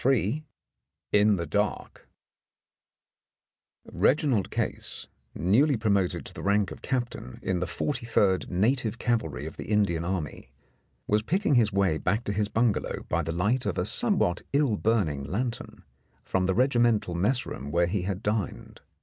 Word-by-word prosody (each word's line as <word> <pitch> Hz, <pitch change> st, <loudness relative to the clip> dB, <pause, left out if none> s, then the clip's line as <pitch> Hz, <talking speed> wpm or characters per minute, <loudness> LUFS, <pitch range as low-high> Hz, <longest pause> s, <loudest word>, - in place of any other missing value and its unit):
109 130 Hz, +2 st, +1 dB, 0.7 s
IN 105 Hz, 0 st, +5 dB
THE 85 Hz, -2 st, -3 dB
DARK 105 Hz, +5 st, -2 dB, 1.8 s
Reginald 135 Hz, -8 st, +1 dB
Case, -, -, -3 dB, 0.3 s
newly 120 Hz, -, +3 dB
promoted 100 Hz, -4 st, 0 dB
to -, -, -9 dB
the -, -, -8 dB
rank 100 Hz, 0 st, +1 dB
of -, -, -9 dB
Cap 125 Hz, -2 st, -1 dB
tain 60 Hz, -, -9 dB
in 95 Hz, -1 st, 0 dB
the 90 Hz, -, -2 dB
43rd 115 Hz, -9 st, 0 dB
Native 115 Hz, +5 st, +1 dB
Cavalry 115 Hz, -, -1 dB
of -, -, -8 dB
the -, -, -6 dB
Indian 100 Hz, -6 st, +1 dB
Army, 85 Hz, -7 st, -4 dB, 0.6 s
was 105 Hz, +1 st, +2 dB
picking 185 Hz, -, +1 dB
his 115 Hz, -5 st, +4 dB
way 95 Hz, -5 st, +1 dB
back 105 Hz, +5 st, 0 dB
to 100 Hz, -, -2 dB
his 105 Hz, 0 st, 0 dB
bungalow 115 Hz, -2 st, 0 dB
by -, -, +1 dB
the 80 Hz, -, -3 dB
light 105 Hz, +10 st, 0 dB
of -, -, -2 dB
a -, -, 0 dB
somewhat 90 Hz, 0 st, +1 dB
ill 140 Hz, -6 st, +3 dB
burning 100 Hz, -11 st, 0 dB
lantern 115 Hz, -, -4 dB, 0.4 s
from 95 Hz, -1 st, 0 dB
the 95 Hz, -, +1 dB
regimental 120 Hz, -6 st, +2 dB
mess 105 Hz, +9 st, +1 dB
room 70 Hz, -, -6 dB
where 85 Hz, +3 st, +2 dB
he 95 Hz, +2 st, -1 dB
had 95 Hz, +2 st, -3 dB
dined. 105 Hz, -2 st, -3 dB
105 Hz, 155 wpm, -27 LUFS, 90-120 Hz, 1.8 s, IN